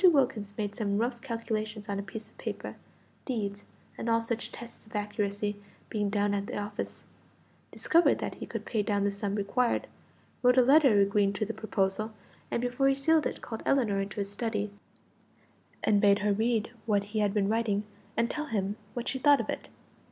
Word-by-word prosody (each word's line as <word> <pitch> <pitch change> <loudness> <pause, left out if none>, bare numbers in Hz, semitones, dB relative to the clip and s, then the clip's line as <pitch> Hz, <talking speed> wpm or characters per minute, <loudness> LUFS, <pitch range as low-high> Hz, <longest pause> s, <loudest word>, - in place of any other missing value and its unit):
Wilkins 260 - +4
made 205 -2 -2
some 205 -4 0
rough 240 +2 -1
calculations 220 -3 -3
on 200 -1 -2
a - - 0
piece 215 +2 -8
of - - -25
paper - - -5 0.5
deeds, 205 -5 -3 0.4
and 230 - -2
all 230 0 +4
such 230 0 -3
tests 235 0 -10
of 220 - -12
accuracy, 205 0 -2 0.3
being 205 -2 0
down 205 0 +1
at 200 0 -1
the - - -4
office; 205 0 -4 0.7
discovered 340 +1 +4
that - - -3
he - - -8
could - - -5
pay 220 - 0
down 205 -1 +1
the 200 - +2
sum 200 0 -2
required; 225 +4 +1 0.6
wrote 250 0 +5
a 255 - +8
letter 270 -5 +6
agreeing 200 0 +3
to 215 - -1
the 225 - -4
proposal, 215 0 -1 0.4
and 235 - -1
before 245 +2 +2
he 275 - +4
sealed 310 +3 +3
it - - -7
called 225 -2 -5
Ellinor 225 -8 +2
into 195 0 -5
his 200 0 -2
study, 210 -1 -2 1.1
and 205 -1 +4
bade 200 -1 +6
her 205 - +4
read 225 +1 +1 0.2
what 205 -2 +3
he 215 - +1
had 205 -1 +3
been 200 -1 +1
writing 215 -2 +1 0.3
and 230 +1 +3
tell 300 +4 -3
him 205 -6 -1 0.2
what 240 0 -3
she 265 - -1
thought 285 +1 +6
of 225 - -1
it. - - -6
215 Hz, 195 wpm, -30 LUFS, 205-240 Hz, 1.1 s, a